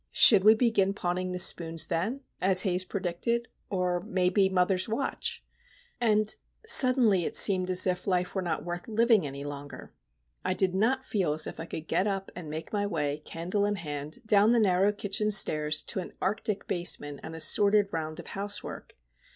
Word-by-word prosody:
Should 205 -5 +7
we 215 +2 +7
begin 215 -4 +1
pawning 180 0 -3
the 180 - -3
spoons 165 -2 +2
then,—as 190 0 -1
Haze 185 -2 +2
predicted,—or, 185 -1 -3
maybe, 190 0 +1
mother's 185 +1 +1
watch? 235 +5 -3 0.5
And, 215 -2 +2 0.3
suddenly, 255 - +5
it - - -4
seemed 185 -2 +4
as 185 0 +2
if 180 0 -2
life 180 -1 0
were 190 - -2
not 175 -2 -3
worth 175 0 -6
living 225 -5 +2
any 140 0 -7
longer. 145 0 -9 0.5
I 185 - -1
did 185 -1 0
not 250 +7 0
feel 185 -8 -1
as 155 +1 +2
if - - -8
I 165 - -5
could 160 -1 -7
get 190 - 0
up 195 -1 -3
and 170 -4 -8
make 155 +6 -7
my 205 -1 0
way, 150 -5 -2
candle 175 +6 -3
in 205 0 0
hand, 150 -2 -6
down 215 +1 +4
the 240 - +3
narrow 195 -1 +3
kitchen 205 +1 -2
stairs 155 -6 +1
to - - -3
an 180 - -7
arctic 205 +1 -2
basement, 145 -5 -2
and 160 - -8
a - - -7
sordid 205 +3 +2
round 155 -1 -5
of - - -9
housework. 200 0 -6
185 Hz, 175 wpm, -28 LUFS, 170-210 Hz, 0.5 s, Should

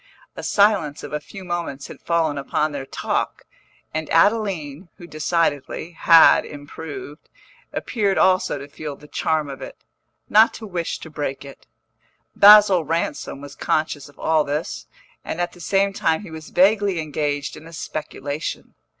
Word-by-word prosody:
A - - -6
silence 200 -8 +2
of - - -8
a 150 - -1
few 190 +6 -11
moments 170 -6 -4
had - - -11
fallen 165 -3 0
upon 150 +2 -1
their 140 -2 -6
talk, - - -2 0.5
and 160 0 -3
Adeline 180 -4 +1
who 175 - -11
decidedly 160 -1 -1
had 165 -1 +6
improved 145 +1 -9 0.4
appeared 205 -5 -1
also 185 -5 +3
to 140 0 -8
feel 145 0 -7
the 150 - -16
charm 155 0 -1
of 135 -1 -8
it, - - -8 0.5
not 220 +2 +5
to 225 - -8
wish 175 -5 -3
to 160 - -10
break 145 -2 -4
it. 140 - -13 0.7
Basil 205 -4 +8
Ransom 150 -3 -3
was 145 -1 -9
conscious 150 -2 -2
of 145 - -21
all 160 -1 +2
this, 150 +4 -4 0.4
and 160 - -5
at 175 0 -1
the 175 - -15
same 195 +3 +1
time 160 -1 0
he 185 - -10
was 160 -1 -9
vaguely 195 0 +3
engaged 145 -2 -2
in 155 +2 -12
a - - -12
speculation. 150 -1 -5
160 Hz, 160 wpm, -22 LUFS, 145-180 Hz, 0.7 s, Basil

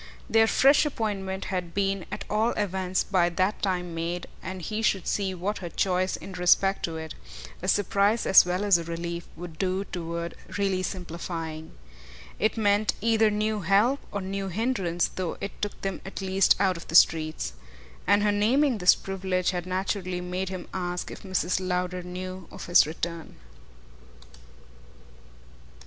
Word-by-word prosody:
Their 225 0 +4
fresh 275 +6 +5
appointment 200 -8 -3
had 180 -2 -3
been 195 -2 0
at - - -5
all 220 +3 +1
events 190 -2 -1
by 180 -3 +2
that 185 +4 0
time 180 -3 -1
made, 170 +2 -3 0.2
and 185 +2 -6
he 215 +5 -3
should 195 -4 +1
see 195 -2 -1
what 195 +4 -2
her 175 - -6
choice 185 +2 0
in - - -9
respect 185 +2 +3
to 165 -1 -5
it 160 -1 -6 0.5
a - - -4
surprise 205 +2 +2
as 190 - +8
well 180 +2 -1
as 200 -4 +5
a - - -4
relief 170 +1 -5
would 165 -1 -9
do 190 0 0
toward 170 -1 -4 0.2
really 195 -2 +1
simplifying. 170 -3 -5 0.7
It 215 +2 +1
meant 205 -1 +2
either 225 0 +3
new 210 +1 0
help 205 - +3
or 200 - -3
new 195 +1 -3
hindrance, 190 -4 0
though 185 -3 -4
it 200 - -7
took 205 - -3
them 195 -1 -3
at 195 - -7
least 190 -1 +3
out 190 -3 +2
of 170 - -10
the 165 - -4
streets. 155 - +4 0.5
And 205 +2 +4
her 210 - +3
naming 235 +5 +2
this 180 0 +6
privilege 190 -2 -1
had 180 -1 -4
naturally 185 -1 -2
made 180 +1 -3
him 185 -2 -6
ask 180 -1 -3
if - - -9
Mrs. 185 -2 0
Lowder 180 0 -2
knew 185 0 -7
of - - -9
his 175 -3 +6
return. 165 +1 -5
185 Hz, 160 wpm, -27 LUFS, 175-200 Hz, 0.7 s, as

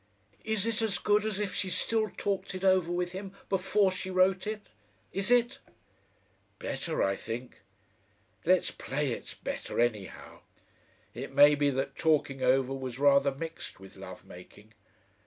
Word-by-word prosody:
"Is 220 -2 0
it 230 -1 0
as 220 -3 0
good 210 +1 +2
as 210 -2 -2
if 205 -2 -2
she 190 - -1
still 220 +3 +1
talked 200 -1 -3
it 185 - -6
over 185 -3 +3
with 175 0 -1
him 190 +1 -7 0.2
before 195 +1 +2
she 185 0 -4
wrote 185 +1 +2
it? 215 -1 -4 0.5
Is 195 +2 -1
it?" 245 +2 +3 1.0
"Better, 335 - -2
I 95 0 +1
think. 120 +4 -7 0.8
Let's 185 +1 +3
play 140 0 -2
it's - - -6
better - - -5
anyhow. 110 -5 -2 0.7
It - - -7
may 145 +1 +8
be 145 -1 +2
that 135 0 -2
talking 145 -4 +1
over 130 +1 +3
was 130 -2 -5
rather 140 0 +5
mixed 160 -2 -7
with 95 0 -13
love - - -10
making. 105 +4 -14
175 Hz, 155 wpm, -30 LUFS, 135-200 Hz, 1.0 s, may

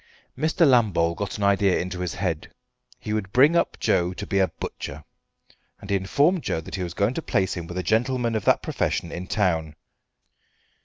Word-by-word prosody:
Mr. 160 +1 +2
Lambole 100 -10 +3
got 100 +5 -4
an 105 - -3
idea 100 -1 +3
into 90 0 -4
his 90 -1 -3
head, 90 -4 -3 0.5
he 105 - -4
would 100 -3 -2
bring 145 +8 +5
up - - +1
Joe 90 +1 +1
to - - -5
be 100 - 0
a 95 - +4
butcher, - - -7 0.8
and 100 - -8
he - - +3
informed 145 - +2
Joe - - -2
that 80 - -10
he 95 - -3
was 85 -2 -4
going 100 +5 +1
to 165 - -3
place 95 - 0
him 85 -2 -6
with 90 - -7
a 90 - -1
gentleman 120 +2 +1
of 110 -3 -1
that - - +3
profession 85 - -2
in 90 +1 -6
town. 80 -7 0
100 Hz, 200 wpm, -24 LUFS, 90-115 Hz, 0.8 s, bring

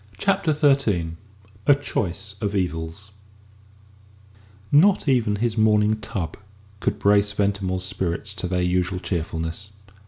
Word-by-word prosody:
CHAPTER 190 - +1
XIII 135 - +2 0.5
A 145 - +7
CHOICE 100 -7 -3
OF 105 -1 -1
EVILS 85 +1 -3 1.6
Not 180 +4 +5
even 120 -6 +2
his 115 +1 -1
morning 110 0 +3
tub 85 -7 -4 0.4
could - - -1
brace 105 0 +3
Ventimore's 100 -2 -1
spirits 95 +1 -2
to 95 - -4
their 90 0 0
usual 90 +1 0
cheerfulness. 85 +1 -4
100 Hz, 115 wpm, -23 LUFS, 90-110 Hz, 1.6 s, A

